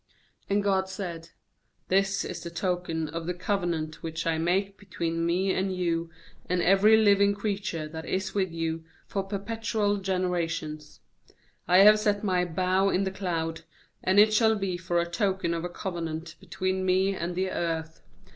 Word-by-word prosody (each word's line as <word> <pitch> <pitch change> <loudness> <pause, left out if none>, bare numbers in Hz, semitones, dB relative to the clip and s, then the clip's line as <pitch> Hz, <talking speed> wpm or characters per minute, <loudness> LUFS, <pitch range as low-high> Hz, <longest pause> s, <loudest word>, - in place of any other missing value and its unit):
12And 200 +1 +2
God 190 -1 +1
said: 175 -4 -6 0.6
'This 195 +1 +2
is - - -5
the 170 - -6
token 170 -2 -2
of 165 +1 -5
the 180 - -2
covenant 175 -5 -2
which 160 0 -4
I 165 -1 +1
make 190 +4 0
between 165 -4 -3
Me 185 +3 +1
and 190 0 -1
you 170 -2 -1 0.4
and 180 0 +1
every 195 +5 +5
living 200 -2 +4
creature 200 -6 -3
that 160 +1 -8
is 190 +1 -2
with 190 -3 0
you, 165 0 -3 0.2
for 195 - -2
perpetual 205 +1 -1
generations: 170 -5 -2 0.7
WI 180 +2 +7
have 210 +1 +8
set 205 -1 0
My 185 -3 +2
bow 185 +3 +1
in 195 0 +1
the 190 - -1
cloud, 165 -4 -3 0.4
and 185 +2 +2
it 215 +1 +6
shall 220 0 +4
be 195 -3 -2
for 175 -1 -1
a 170 - +1
token 185 0 0
of 165 0 -3
a 175 - -3
covenant 165 -3 -5
between 185 0 -2
Me 190 +1 +2
and 175 0 -3
the 185 +1 -1
earth. 165 -1 -3
185 Hz, 165 wpm, -27 LUFS, 165-195 Hz, 0.7 s, have